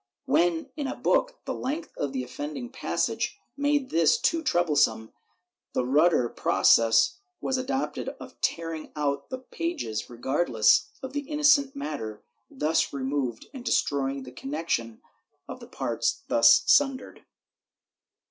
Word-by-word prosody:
When, 170 -1 +1
in 290 -3 -3
a - - -4
book, - - +1
the - - -2
length 305 +6 -4
of 140 - -2
the 130 -2 -3
offending 150 - -6
passage 265 - -2 0.2
made 285 -1 0
this 165 -1 +4
too 330 -1 +1
trouble 175 - +1
some, 110 -5 +2 0.6
the 125 - 0
ruder 145 -1 +3
process 115 - +3 0.2
was 265 - -1
adopted 265 +1 -2
of - - -12
tearing 165 -1 -2
out 140 -2 -2
the 260 - -4
pages, 285 - -4
regardless 120 - +2
of 265 0 -6
the 290 0 -4
innocent 295 -2 +3
matter 115 - -5 0.3
thus 155 +4 0
removed 135 -3 -3
and 260 -3 -8
destroying 140 - 0
the 125 - -10
connection 135 -5 -3 0.4
of - - -8
the - - -12
parts - - -2
thus 115 +1 +6
sundered.' 265 - +2
160 Hz, 135 wpm, -27 LUFS, -, 0.6 s, thus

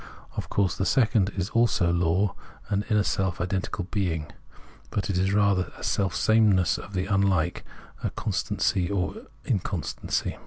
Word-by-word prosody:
Of - - -4
course 95 -5 +1
the 95 - -1
second 110 -4 +3
is 95 +2 -2
also 115 -7 +3
a - - +1
law, 90 +3 +2 0.4
an 100 0 +1
inner 105 -1 +3
self 95 -3 -1
identical 95 +2 -2
bemg; 85 -6 -2 0.6
but 100 -1 -1
it 90 - -1
is 95 +1 +2
rather 100 -2 +2
a - - -12
selfsameness 100 -1 +3
of 100 - -10
the 90 -1 -1
unlike, 95 -4 +1 0.4
a - - +1
constancy 90 -2 -1
of 95 -3 -2 0.2
inconstancy. - - -2
95 Hz, 150 wpm, -26 LUFS, 90-100 Hz, 0.6 s, second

